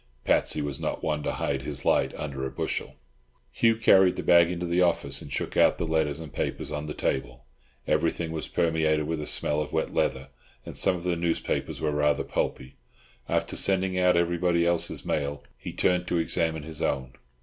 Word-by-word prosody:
Patsy 75 - +2
was 70 -2 -4
not - - -3
one 75 -1 -1
to - - -2
hide - - -2
his - - -5
light - - +3
under 70 -3 -5
a 65 - -2
bushel. 65 - -3 0.6
Hugh 115 -1 +3
carried 95 -5 +5
the - - -4
bag 85 -1 +6
into 90 0 -3
the 85 +1 +1
office, 70 -6 +1
and 70 - -10
shook - - -3
out - - +4
the - - -2
letters 80 -2 0
and 80 -4 -9
papers - - -3
on 75 0 -4
the 75 - -5
table. 60 -1 -3 0.4
Everything 80 -2 0
was 80 -1 -4
permeated 80 -2 +1
with 80 0 -2
a 75 - -5
smell 75 +1 0
of 75 - -5
wet - - -1
leather, 65 +1 -1 0.4
and - - -8
some 95 - +4
of 85 - -7
the 90 -1 0
newspapers 85 0 -2
were 75 - 0
rather 75 -1 +1
pulpy. 65 - -3 0.5
After - - 0
sending 95 -1 +1
out 90 -1 +4
everybody 85 0 +2
else's 85 -1 0
mail 70 -1 -2
he - - -7
turned 90 0 +1
to 85 - 0
examine 80 -1 0
his 80 0 -7
own. 65 -2 -1
80 Hz, 195 wpm, -27 LUFS, 75-85 Hz, 0.6 s, bag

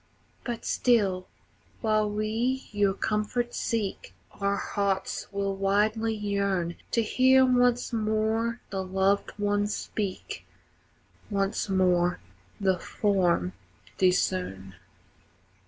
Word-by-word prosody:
But 240 -2 -4
still, 195 -7 +2 0.5
while 215 -2 +2
we 225 +5 -1
your 205 -2 +2
comfort 220 +4 -1
seek, 220 -4 -3 0.2
Our 200 0 -1
hearts 195 -2 -2
will 200 -1 -1
wildly 215 +3 +1
yearn 200 -4 -1 0.2
To 230 - +3
hear 260 +3 +5
once 245 -1 +2
more 220 +1 0
the 190 -1 -2
loved 190 +2 +1
one 205 0 +1
speak, 205 -2 -4 0.9
Once 200 0 -1
more 180 -2 +2 0.4
the 190 -3 +2
form 175 - +1 0.5
discern. 180 - +1
205 Hz, 95 wpm, -27 LUFS, 190-220 Hz, 0.9 s, hear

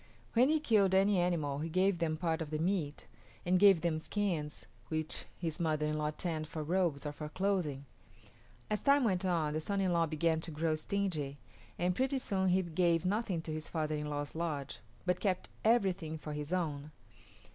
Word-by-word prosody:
When 250 +4 +5
he 310 0 +3
killed 205 -9 +3
any 195 0 +4
animal 160 -6 0
he 160 +2 -3
gave 185 +2 +2
them 160 -2 0
part 165 0 -1
of 155 - -4
the 155 - -2
meat, 160 -3 -1 0.4
and 180 +1 +3
gave 195 -4 +7
them 165 -2 0
skins 165 -5 -2 0.2
which 155 -1 -2
his 165 -3 -3
mother 155 -2 +1
in 150 0 0
law 150 0 0
tanned 155 0 -3
for 155 0 -5
robes 165 -3 0
or 150 - -2
for 150 +1 -7
clothing. 175 -7 -1 0.8
As 210 - -1
time 280 -1 +4
went 190 -5 +1
on 165 -5 +1
the 155 - -1
son 200 +5 -1
in 185 -2 +2
law 170 -1 +3
began 160 +1 +1
to 165 - -3
grow 160 +1 0
stingy, 155 -4 -2 0.4
and 180 +1 +1
pretty 265 +5 +1
soon 190 -7 0
he 185 +1 +3
gave 170 0 +1
nothing 195 -4 0
to 160 - -4
his 155 0 -5
father 155 -2 -1
in 150 0 -3
law's 145 0 -3
lodge, 155 -4 -3 0.3
but 180 -1 +1
kept 190 -3 -1
everything 190 -8 +2
for 155 -1 -6
his 150 +1 -5
own. 155 -5 -1
165 Hz, 195 wpm, -33 LUFS, 155-190 Hz, 0.8 s, gave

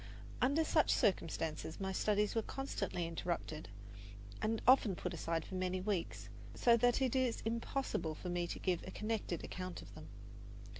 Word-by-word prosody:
Under 280 +6 +4
such 310 0 +3
circumstances 165 -4 0
my 190 -1 -1
studies 210 +2 +2
were 225 - +2
constantly 205 -9 -3
interrupted 165 -3 -3 0.7
and 220 +1 +1
often 245 -7 +6
put - - -4
aside 165 0 -1
for - - -10
many 185 0 0
weeks, 190 -2 -2 0.3
so 235 -1 +5
that 245 +3 +3
it 260 -1 +1
is 255 -3 +1
impossible 230 - -1
for 180 - -6
me 175 0 0
to - - -4
give 180 -3 0
a - - -7
connected 210 -4 -2
account 185 -1 -5
of - - -13
them. - - -10
195 Hz, 160 wpm, -36 LUFS, 175-230 Hz, 0.7 s, often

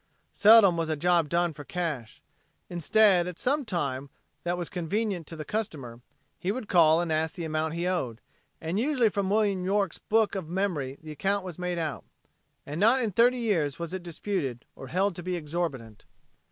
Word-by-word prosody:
Seldom 210 -5 +7
was 165 -1 -1
a 155 - +1
job 170 0 +2
done 170 0 +1
for 145 -1 -9
cash. 150 -9 -4 0.5
Instead, 180 +1 +4
at 180 -2 -6
some 285 +3 0
time 140 - -3 0.3
that 175 0 -1
was 175 -2 -3
convenient 180 0 -2
to 165 - -6
the 155 -1 -7
customer, 140 - -4 0.4
he 185 - -1
would 225 -1 -5
call 165 -2 +5
and 170 -2 -2
ask 160 +1 0
the 170 -3 -4
amount 155 0 -2
he 170 +1 -1
owed, 130 -12 -2 0.4
and 165 +5 -2
usually 255 -3 +2
from 200 -2 -1
William 200 -3 +1
York's 195 +1 0
book 220 -1 +1
of 185 -5 -4
memory 170 -8 -2
the 155 - -8
account 195 +5 -1
was 180 -2 -7
made 180 -1 -2
out. 160 -3 -3 0.6
And 145 +3 -5
not 230 +6 +5
in 230 -4 -1
thirty 240 +6 +4
years 175 - 0
was 170 0 -5
it 185 - -3
disputed, 170 - -4
or 135 - -9
held 190 +5 0
to - - -5
be 180 +1 -2
exorbitant. 150 -9 -4
175 Hz, 190 wpm, -28 LUFS, 155-200 Hz, 0.6 s, Seldom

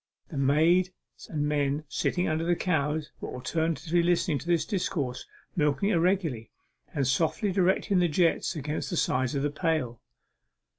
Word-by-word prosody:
The 150 - -6
maids 160 +7 +3 0.4
and 150 -2 -1
men 145 0 0
sitting 180 +6 0
under 155 +1 0
the 175 +1 +2
cows 155 -3 -1
were - - -5
all 125 - -7
attentively 165 +3 0
listening 170 -3 +1
to 160 - -11
this 170 -3 +2
discourse, 145 -10 -2 0.3
milking 150 +4 +1
irregularly, 170 - +1 0.4
and 140 - -1
softly 160 - +1
directing 190 +1 +2
the 175 - +3
jets 170 +2 +1
against 150 0 -3
the 175 - -2
sides 130 -1 +1
of 140 - 0
the 145 - 0
pail. 155 -8 -1
160 Hz, 155 wpm, -28 LUFS, 145-175 Hz, 0.4 s, maids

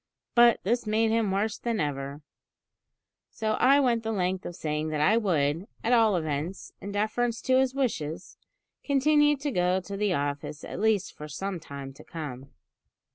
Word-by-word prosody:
But 240 -1 +6
this 235 +3 0
made 220 +1 +2
him 225 -2 +2
worse 200 +3 -1
than 235 -2 -1
ever; 140 0 -3 1.1
so 220 -1 -2
I 275 +3 +6
went 240 -4 +2
the 225 0 -3
length 185 -2 -1
of 175 - -7
saying 155 0 -2
that 155 -1 -2
I 195 +9 +4
would, 170 -5 +1 0.2
at 235 - +2
all 225 -4 +5
events, 155 +2 -3
in 200 - -6
deference 220 +3 0
to 260 -1 +4
his 265 0 +1
wishes, 180 - -3 0.4
continue 295 +1 +3
to 285 +1 -3
go 180 -2 +2
to 200 +2 -7
the 205 -1 +1
office 145 +1 -3
at - - -6
least 210 -2 +1
for 150 - -9
some 190 +5 -4
time 140 -3 -8
to - - -14
come. 140 -5 -7
200 Hz, 175 wpm, -27 LUFS, 155-230 Hz, 1.1 s, But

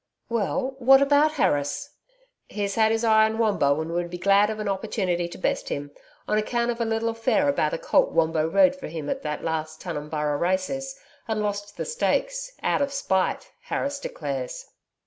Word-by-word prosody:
'Well, 245 +4 -1
what 270 +2 +7
about 290 +2 +4
Harris?' 145 - 0 0.6
'He's 200 -1 -2
had 220 +1 +3
his 225 +1 0
eye 220 -1 +5
on 220 0 -1
Wombo 195 -11 +2
and 160 +1 -5
would 175 0 -2
be 180 - -6
glad 200 +3 +4
of 220 - -3
an 210 - -3
opportunity 185 -3 -1
to - - -9
best - - -1
him 145 0 -4 0.4
on 210 - +2
account 235 +2 0
of 235 0 -5
a - - +1
little 225 +1 0
affair 230 +6 +1
about 280 - +1
a - - -3
colt - - +2
Wombo 160 -1 +2
rode 275 - +4
for 275 - -8
him 155 -2 -4
at - - -3
the 150 -1 -3
last 160 -1 -3
Tunumburra 150 -3 -2
races 190 - -1 0.3
and 220 -2 -1
lost 205 0 -4
the - - -3
stakes - - -1
out - - +1
of 280 0 0
spite, 275 - -1
Harris 280 - -2
declares.' 140 - -5
210 Hz, 185 wpm, -25 LUFS, 165-270 Hz, 0.6 s, what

